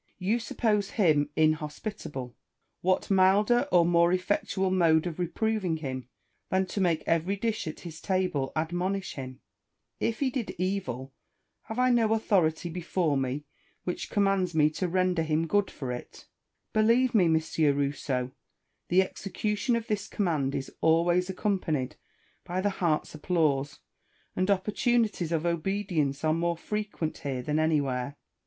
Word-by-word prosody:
You 200 Hz, +6 st, 0 dB
suppose 210 Hz, -2 st, 0 dB
him 150 Hz, -8 st, +3 dB
inhospitable: 150 Hz, -, -2 dB, 0.5 s
what 185 Hz, +2 st, +1 dB
milder 200 Hz, +5 st, +4 dB
or 175 Hz, -2 st, +5 dB
more 170 Hz, 0 st, +4 dB
effectual 190 Hz, 0 st, 0 dB
mode 165 Hz, -3 st, +4 dB
of 175 Hz, -1 st, -4 dB
reproving 185 Hz, -1 st, 0 dB
him, 130 Hz, -4 st, -5 dB, 0.4 s
than 190 Hz, 0 st, +2 dB
to 200 Hz, -, -1 dB
make 170 Hz, -4 st, +1 dB
every 165 Hz, +4 st, +1 dB
dish 215 Hz, -2 st, -2 dB
at 155 Hz, -, -6 dB
his 165 Hz, -2 st, -9 dB
table 185 Hz, -8 st, 0 dB
ad 160 Hz, +1 st, -1 dB
monish 190 Hz, +2 st, -2 dB
him? 130 Hz, -1 st, -8 dB, 0.6 s
If 230 Hz, -, -1 dB
he 270 Hz, -2 st, +1 dB
did 245 Hz, -4 st, -3 dB
evil, 140 Hz, -9 st, -3 dB, 0.5 s
have' 220 Hz, -, -6 dB
I 255 Hz, 0 st, +4 dB
no 225 Hz, -2 st, +3 dB
authority 180 Hz, -7 st, +1 dB
before 170 Hz, -2 st, -1 dB
me 135 Hz, +2 st, -2 dB, 0.4 s
which 180 Hz, -, -4 dB
commands 195 Hz, -4 st, +1 dB
me 155 Hz, -1 st, +4 dB
to 185 Hz, +4 st, -2 dB
render 180 Hz, -1 st, +1 dB
him 160 Hz, 0 st, +1 dB
good 205 Hz, +3 st, +1 dB
for 130 Hz, -4 st, -5 dB
iti 125 Hz, -, -8 dB, 0.5 s
Believe 230 Hz, +4 st, +3 dB
me, 200 Hz, -6 st, +5 dB
M. 160 Hz, -1 st, +4 dB, 0.4 s
Rousseau, 140 Hz, -3 st, -1 dB, 0.6 s
the 185 Hz, +2 st, +4 dB
execution 210 Hz, +5 st, -2 dB
of 230 Hz, -1 st, -2 dB
this 205 Hz, -2 st, -2 dB
command 150 Hz, -8 st, 0 dB
is 135 Hz, -1 st, -4 dB
always 175 Hz, +3 st, +3 dB
accompanied 185 Hz, -, -1 dB, 0.5 s
by 180 Hz, +1 st, -3 dB
the 205 Hz, +2 st, +1 dB
heart's 170 Hz, -5 st, 0 dB
applause, 150 Hz, -3 st, 0 dB, 0.5 s
and 185 Hz, +2 st, 0 dB
opportunities 210 Hz, -2 st, +1 dB
of 165 Hz, 0 st, 0 dB
obedience 170 Hz, -5 st, -1 dB
are 155 Hz, 0 st, +3 dB
more 170 Hz, +1 st, 0 dB
frequent 210 Hz, -4 st, -3 dB
here 130 Hz, -3 st, -3 dB
than 150 Hz, +4 st, 0 dB
anywhere. 140 Hz, -4 st, 0 dB
175 Hz, 145 wpm, -28 LUFS, 155-200 Hz, 0.6 s, or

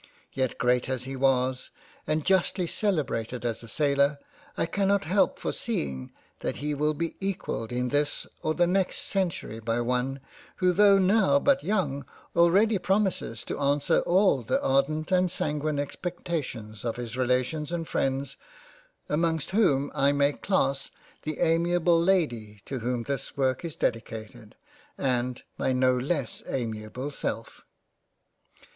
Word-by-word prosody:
Yet 130 Hz, -2 st, -1 dB
great 125 Hz, +1 st, +2 dB
as 130 Hz, -2 st, -2 dB
he 135 Hz, +1 st, -5 dB
was, 130 Hz, -1 st, +1 dB, 0.4 s
and 155 Hz, -1 st, 0 dB
justly 190 Hz, -1 st, +2 dB
celebrated 140 Hz, -, -1 dB
as 115 Hz, -2 st, -2 dB
a 115 Hz, -, -10 dB
sailor, 140 Hz, +3 st, +2 dB, 0.4 s
I -, -, +1 dB
cannot 200 Hz, +3 st, +1 dB
help 190 Hz, +5 st, +2 dB
foreseeing 65 Hz, -3 st, -3 dB, 0.3 s
that -, -, -2 dB
he 150 Hz, +1 st, -2 dB
will 150 Hz, +1 st, 0 dB
be 165 Hz, +1 st, -3 dB
equalled 190 Hz, -, -3 dB
in 125 Hz, 0 st, -1 dB
this 145 Hz, +2 st, 0 dB, 0.2 s
or 155 Hz, 0 st, 0 dB
the 175 Hz, -, +4 dB
next 185 Hz, +1 st, 0 dB
Century 175 Hz, -, -2 dB
by 115 Hz, +1 st, -1 dB
one 125 Hz, +3 st, -1 dB, 0.4 s
who 180 Hz, -1 st, +2 dB
tho* 200 Hz, +1 st, +6 dB
now 195 Hz, +7 st, +4 dB
but 280 Hz, -1 st, +3 dB
young, 185 Hz, -9 st, 0 dB, 0.3 s
already 195 Hz, +5 st, +4 dB
promises 195 Hz, +1 st, 0 dB
to -, -, -5 dB
answer 140 Hz, 0 st, +2 dB
all 185 Hz, -6 st, +3 dB
the 115 Hz, -, 0 dB
ardent 150 Hz, +5 st, +1 dB
and 185 Hz, 0 st, +3 dB
sanguine 150 Hz, -1 st, -1 dB
expectations 145 Hz, -, -4 dB
of 115 Hz, -2 st, -2 dB
his 120 Hz, -1 st, -5 dB
Relations 130 Hz, +5 st, 0 dB
and 165 Hz, -2 st, -3 dB
Freinds, 135 Hz, 0 st, -1 dB, 0.7 s
amongst 160 Hz, +1 st, 0 dB
whom 150 Hz, -10 st, +2 dB
I 140 Hz, +1 st, +3 dB
may 140 Hz, 0 st, +3 dB
class 135 Hz, -9 st, 0 dB, 0.3 s
the 155 Hz, 0 st, -4 dB
amiable 170 Hz, +1 st, +3 dB
Lady 120 Hz, -, 0 dB
to 135 Hz, -, -4 dB
whom 120 Hz, 0 st, -2 dB
this 140 Hz, +2 st, -4 dB
work 130 Hz, 0 st, +1 dB
is 165 Hz, -3 st, -5 dB
dedicated, 110 Hz, -1 st, -4 dB, 0.4 s
and 125 Hz, -2 st, -1 dB, 0.2 s
my 130 Hz, -, +1 dB
no 130 Hz, 0 st, +3 dB
less 135 Hz, 0 st, -2 dB
amiable 115 Hz, +3 st, -4 dB
self. 115 Hz, -4 st, -4 dB
140 Hz, 140 wpm, -27 LUFS, 125-175 Hz, 0.7 s, tho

